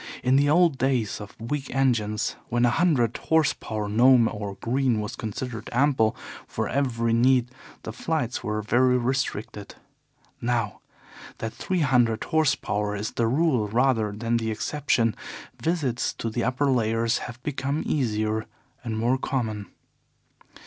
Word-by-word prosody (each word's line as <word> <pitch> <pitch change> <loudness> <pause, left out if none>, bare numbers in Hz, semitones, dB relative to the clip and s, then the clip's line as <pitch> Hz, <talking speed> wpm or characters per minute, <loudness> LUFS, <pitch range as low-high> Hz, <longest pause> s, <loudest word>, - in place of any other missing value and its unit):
In 125 +1 +3
the 145 +1 +4
old 165 -3 +4
days 125 -6 0
of 105 - -10
weak 135 +4 -4
engines, 110 -6 +1
when 120 +1 +2
a 120 - +3
hundred 140 -10 +2
horse 160 -2 +2
power 105 -1 -4
Gnome 120 +2 +5
or 105 -2 -5
Green 120 +2 0
was 105 +2 -4
considered 115 +2 -5
ample 120 -3 +2 0.3
for - - -3
every 115 -4 0
need, 125 +1 +3 0.3
the 110 - -6
flights 130 -2 -2
were 105 0 -2
very 125 +4 +3
restricted. 120 -5 -3 0.7
Now 115 -4 -1 0.6
that 115 0 -5
three 185 -2 -2
hundred 120 -6 +2
horse 155 -4 +2
power 105 0 -2
is 105 +1 -3
the 115 - 0
rule 130 -4 +2
rather 115 -1 +2
than 115 +3 -1
the 115 -1 -2
exception, 115 +1 0 0.5
visits 150 -8 0
to 115 - -4
the 120 +1 -1
upper 130 +3 +1
layers 115 -1 +1
have 120 +1 -10
become 140 +1 -2
easier 110 -5 -1 0.4
and 110 -2 -3
more 120 +4 +1
common. 110 -7 -2
120 Hz, 145 wpm, -25 LUFS, 110-135 Hz, 0.7 s, Gnome